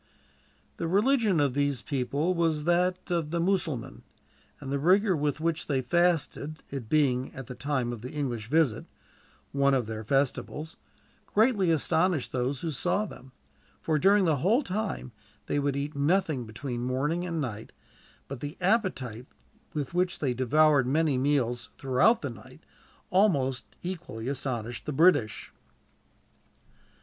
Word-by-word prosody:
The 165 - -2
religion 210 - +3
of 140 -3 +2
these 140 -4 0
people 140 - -1
was 165 -3 0
that 180 +2 +1
of 165 -3 0
the 170 +2 -1
Mussulmans, 170 -8 -1 0.6
and 135 - -7
the 140 - 0
rigor 190 +5 +4
with 145 -1 -1
which 165 0 -1
they 135 -3 0
fasted 165 -1 0
it 130 -6 -6
being, 135 -4 +2
at 135 - -7
the 125 - -7
time 125 -1 -2
of 115 - -8
the 125 - -6
English 125 -8 -3
visit, 150 -4 +2 0.7
one 140 -1 +3
of 125 -3 0
their 110 0 -5
festivals 140 +5 -1 0.6
greatly 210 -4 +4
astonished 160 0 +1
those 130 +2 -1
who 165 - -2
saw 150 +9 0
them; 130 -9 -12 0.5
for, 155 -2 0
during 195 +4 +4
the 160 -4 +2
whole 215 - +2
time, 195 - -3 0.3
they 145 - 0
would 140 -1 0
eat 145 +2 -3
nothing 150 -3 +1
between 120 +2 -5
morning 140 +7 -1
and 170 -2 -3
night; 110 -7 -5 0.6
but 140 -2 -6
the 145 +4 -6
appetite 175 - 0 0.5
with 145 0 -3
which 180 +1 +1
they 135 -4 0
devoured 135 +2 +3
many 150 +1 +2
meals, 125 -3 0
throughout 180 - +3
the - - -2
night, - - -14 0.5
almost 145 -10 +2 0.2
equally 170 -11 -5
astonished 120 -4 -3
the - - -1
British. 145 - +2
145 Hz, 145 wpm, -28 LUFS, 130-175 Hz, 0.7 s, rigor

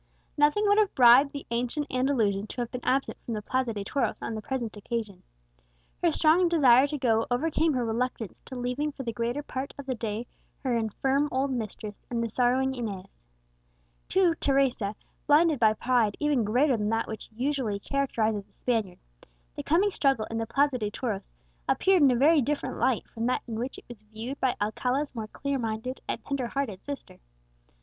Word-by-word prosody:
Nothing 295 +9 +3
would 410 +1 +5
have 420 -2 +1
bribed 250 +3 +7
the 280 0 -7
ancient 245 +5 -1
Andalusian 230 -6 +1
to 245 - -5
have 240 - -4
been 250 -1 -6
absent 270 +1 0
from 230 - -4
the 210 - -3
Plaza 255 +1 0
de 205 -2 -4
Toros 275 +7 -1
on - - -3
the 215 - -4
present 235 -2 -4
occasion; 210 -2 -4 0.8
her - - +4
strong 335 +3 +4
desire 270 -5 +6
to 295 - -3
go 225 -4 +1
overcame 310 +5 +1
her 250 -2 0
reluctance 230 -1 -3
to 260 - -8
leaving 250 +5 -2
for 270 - -7
the 230 -2 -3
greater 240 +6 -2
part 265 -1 -5
of 280 - -8
the 260 - -1
day 225 -1 -4 0.4
her 255 -3 +1
infirm 265 +6 0
old 265 +1 0
mistress 215 -3 -5
and 235 -1 -1
the 230 - -2
sorrowing 255 +3 +2
Inez. 210 -7 -5 1.0
To 370 -2 +4
Teresa, 260 -7 +1 0.3
blinded 300 -1 +4
by 220 -2 +5
pride 235 -2 +1
even 295 -5 +2
greater 250 +6 +3
than 210 -1 -1
that 225 +1 0
which 220 - -7
usually 250 -3 -1
characterizes 220 -4 -1
the - - -33
Spaniard, 220 -7 -1 0.6
the - - -4
coming 375 +7 +2
struggle 270 - +1
in 225 - -2
the 225 - -2
Plaza 275 0 +2
de 210 -2 -1
Toros 210 - -4 0.4
appeared 380 -3 +3
in 280 - +7
a 250 - +3
very 295 +5 +5
different 290 +3 -2
light 255 -4 +1
from 230 +1 -3
that 255 - 0
in 225 -1 -4
which 250 +3 -4
it - - -13
was 240 -4 -11
viewed 220 +6 -7
by 260 -2 +1
Alcala's 250 +7 -1
more 220 -3 -5
clear 280 +4 -3
minded 225 +3 -4
and - - -4
tender 275 -3 -2
hearted 235 -7 -3
sister. 285 -1 -8
250 Hz, 190 wpm, -27 LUFS, 225-280 Hz, 1.0 s, bribed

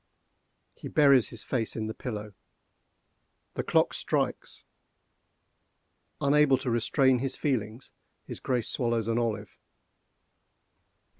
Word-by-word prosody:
He - - -9
buries 140 -5 +4
his 115 - -6
face 115 -4 -2
in 110 - -3
the 110 - -4
pillow. 105 -4 -6 1.2
The - - -2
clock - - +2
strikes! - - -2 1.6
Unable 140 -1 +4
to 130 -1 -3
restrain 130 +2 +2
his 135 +1 -2
feelings, 120 -3 -2 0.3
his - - -8
Grace 125 -4 -1
swallows 115 -3 -1
an 115 +1 +1
olive. 110 -4 -3
120 Hz, 105 wpm, -28 LUFS, 110-135 Hz, 1.6 s, buries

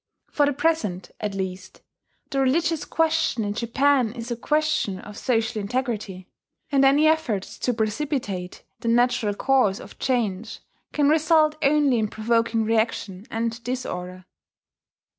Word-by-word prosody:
For 290 -1 +3
the 290 - +1
present, 260 - -1
at 210 -2 -3
least, 190 -1 -5 0.5
the 275 - 0
religious 315 +4 +1
question 320 -7 +1
in 205 0 -2
Japan 245 +1 +2
is 235 0 -7
a - - 0
question 300 -6 0
of 210 +2 -10
social 225 -2 0
integrity; 210 -5 -3 0.4
and 275 -1 +4
any 280 +3 +5
efforts 310 -12 0
to 250 - +1
precipitate 215 - -3 0.2
the - - -6
natural 235 -3 +2
course 250 -5 +2
of - - -12
change 225 -4 -1 0.3
can 290 -1 +2
result 310 0 +4
only 285 -4 +3
in 215 - +1
provoking 230 +1 0
reaction 220 -2 -1
and 230 +1 -3
disorder. 185 -7 -5
235 Hz, 135 wpm, -24 LUFS, 210-285 Hz, 0.5 s, any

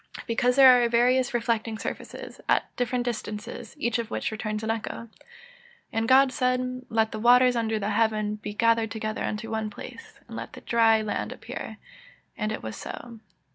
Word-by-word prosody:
_ - - -9
Because 245 +1 +1
there 270 -1 +8
are 235 - +2
various 250 +2 +3
reflecting 230 -2 -1
surfaces, - - -7
at - - +1
different 245 0 -1
distances, 215 -3 -5
each 235 0 0
of 230 -1 -4
which - - -2
returns 215 0 -3
an 220 - 0
echo. 225 0 -4
[Verse: 230 - -12 0.8
"And 225 0 0
God 265 +1 +6
said, 255 -1 -1
Let 220 -1 +1
the 215 - -5
waters 250 +2 +5
under 225 -2 0
the 210 0 -2
heaven 215 -1 +1
be 210 0 -7
gathered 230 0 +3
together 215 0 -4
onto 225 +2 -4
one 220 -1 -2
place, 440 - -11
and - - -9
let - - -7
the - - -10
dry 225 -2 +3
land 215 - -3
appear: - - -7 0.6
and 215 0 -2
it 220 - -5
was 110 -1 -5
so." 235 -2 -8
225 Hz, 185 wpm, -26 LUFS, 215-245 Hz, 0.8 s, there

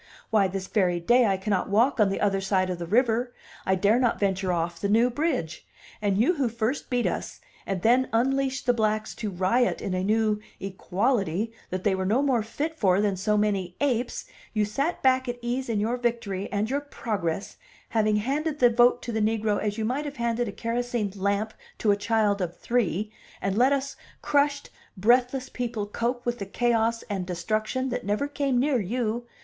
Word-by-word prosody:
Why, 210 -3 +4
this 190 0 -4
very 180 -4 +1
day 240 +7 +4
I 195 -1 +1
cannot 190 0 -1
walk 230 +6 +3
on 210 -2 +5
the 195 - -2
other 195 -2 +1
side 190 -1 +1
of 175 - -4
the 170 - -5
river, 240 +3 +1 0.3
I 190 - +3
dare 205 +5 +3
not 245 -3 +1
venture 190 -2 0
off 170 0 -2
the 200 - -1
New 230 +4 +4
Bridge; 250 - -2 0.4
and 200 -2 +1
you 245 - +4
who 265 -4 +1
first 235 +4 -2
beat 245 -1 +1
us - - -3 0.3
and 190 -2 -2
then 250 +3 +4
unleashed 265 +2 +1
the 245 - +4
blacks 215 -1 0
to 215 - -4
riot 195 +7 +1
in 190 - -3
a 185 0 -1
new 215 +1 +2 0.2
'equality' 195 +1 -1 0.2
that 185 0 -4
they 205 - +2
were 190 0 -1
no 235 +8 +2
more 260 -5 +2
fit 300 +9 -4
for 190 -2 +3
than 205 -2 +1
so 210 +3 +1
many 195 -4 0
apes, 250 -4 -1 0.3
you 210 -1 +2
sat 275 +11 -2
back 260 -1 +3
at 245 - -3
ease 245 +2 -3
in 220 -3 0
your 230 +4 0
victory 230 -5 -2
and 205 +1 0
your 275 +4 -1
progress, 205 - -3 0.3
having 215 -2 +2
handed 285 +8 -1
the 245 -4 +5
vote 245 +1 +4
to 240 - -4
the 220 -1 -1
negro 215 -1 +1
as 210 0 -2
you 220 - -1
might 265 +6 -1
have 290 -1 -6
handed 235 0 0
a - - -3
kerosene 230 -2 -2
lamp 200 +2 -1 0.2
to 210 - +2
a - - +4
child 205 -1 +1
of 175 -2 -3
three, 215 -3 0 0.3
and 195 0 -1
let 250 +5 +4
us 275 0 -1 0.3
crushed, 285 0 +1 0.3
breathless 250 +5 +2
people 235 -4 -3
cope 240 +4 -2
with 240 0 -1
the 200 - -3
chaos 230 +1 +1
and 195 -4 -4
destruction 215 +9 -1
that 245 - -3
never 210 +8 0
came 280 -3 0
near 270 -1 +2
you. 235 +3 -2
220 Hz, 200 wpm, -26 LUFS, 200-245 Hz, 0.4 s, on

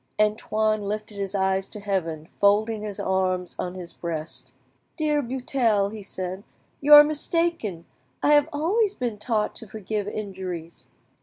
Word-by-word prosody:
Antoine 215 0 +1
lifted 210 +1 -4
his 195 0 -3
eyes 190 0 +1
to 210 - -7
heaven, 185 -6 -2
and 160 - -20
folding 210 +2 +3
his 210 -2 -4
arms 185 -1 0
on 180 0 -3
his 180 -2 -7
breast— 165 -2 -4 0.5
"Dear 300 -2 +1
Buttel," 240 -5 0
he 215 - -7
said, 185 -1 -5 0.4
"you 295 +1 +8
are 295 - +12
mistaken; 305 - -1 0.4
I 295 - +5
have 295 +1 +5
always 390 +8 +1
been 235 -4 -3
taught 215 -2 0
to 225 - -10
forgive 210 0 -4
injuries." 185 -5 -6
210 Hz, 150 wpm, -25 LUFS, 190-245 Hz, 0.5 s, are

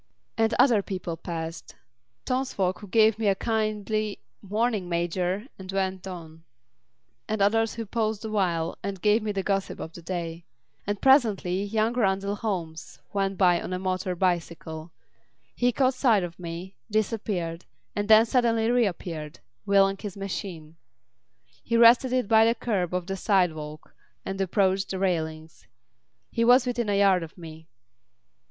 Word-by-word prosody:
And 225 0 +2
other 235 -6 +5
people 185 -4 -5
passed. 165 0 -6 0.5
Townsfolk 250 -8 -1
who 205 - -10
gave 220 +1 +4
me 220 - 0
a 195 - +4
kindly 215 -1 -1 0.2
"Morning, 210 -2 -1
Major!" 175 +4 -1
and 190 0 -7
went 190 -1 -2
on, 165 -3 -9 0.9
and 215 0 -1
others 225 +2 +2
who 230 -1 -4
paused 220 0 -2
awhile 180 -6 -1
and 195 -1 -4
gave 210 +4 +3
me 210 0 -2
the 195 -1 -2
gossip 195 -1 -1
of 160 - -7
the 170 - -10
day. 170 -1 -5 0.4
And 205 0 -1
presently 215 -9 +3
young 215 +3 0
Randall 200 -4 0
Holmes 160 - -4 0.2
went 195 -1 -1
by 180 -2 +4
on - - -5
a - - -1
motor 185 0 -2
bicycle. 170 -2 -2 0.6
He 245 0 +2
caught 260 +2 +2
sight 230 -7 +3
of 170 0 -7
me, 175 +2 -7
disappeared, 200 -6 -2 0.3
and 205 0 -1
then 220 +1 +7
suddenly 230 -2 +2
reappeared, 175 -10 -1 0.3
wheeling 195 0 +4
his 205 -2 -7
machine. 175 -5 -6 0.8
He 230 - 0
rested 240 +2 +6
it 255 -4 +1
by 220 +1 +6
the 230 +1 +3
kerb 185 -8 -1
of 180 -1 -2
the 195 +1 -3
sidewalk 160 -7 -1 0.3
and 195 0 -3
approached 195 0 +1
the 190 - -3
railings. 160 -4 -3 0.6
He 230 - 0
was 245 +2 +6
within 240 -3 -1
a 200 - +2
yard 195 -2 +4
of 165 +2 -9
me. 160 -2 -11
195 Hz, 150 wpm, -26 LUFS, 175-220 Hz, 0.9 s, then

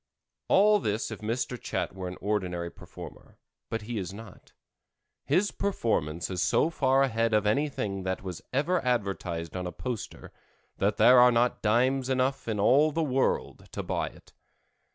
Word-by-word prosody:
All 210 +1 +5
this 110 - -2
if 110 - -6
Mr. 115 +2 -3
Chat - - -3
were 95 -1 -5
an 90 - -7
ordinary 90 -4 -2
performer, - - -12 0.3
but 115 -1 -3
he 115 0 -4
is 95 -1 -5
not. 105 0 -12 0.7
His 200 +3 +2
performance 90 - -1
is 90 -2 -2
so 160 - +2
far 135 -3 +3
ahead 115 -3 +1
of 105 -1 +2
anything 105 -5 0
that 95 0 -3
was 90 -3 -6
ever 160 +6 +1
advertised 95 - -2
on 90 -1 -3
a - - -4
poster, 125 0 -6 0.5
that - - +1
there 125 0 +7
are 125 0 +7
not 120 +1 +1
dimes 130 +4 +2
enough 130 0 0
in 110 -2 -1
all 140 +9 +4
the 165 +2 0
world 135 -3 -1
to - - -3
buy - - -1
it. - - -15
115 Hz, 165 wpm, -28 LUFS, 95-130 Hz, 0.7 s, there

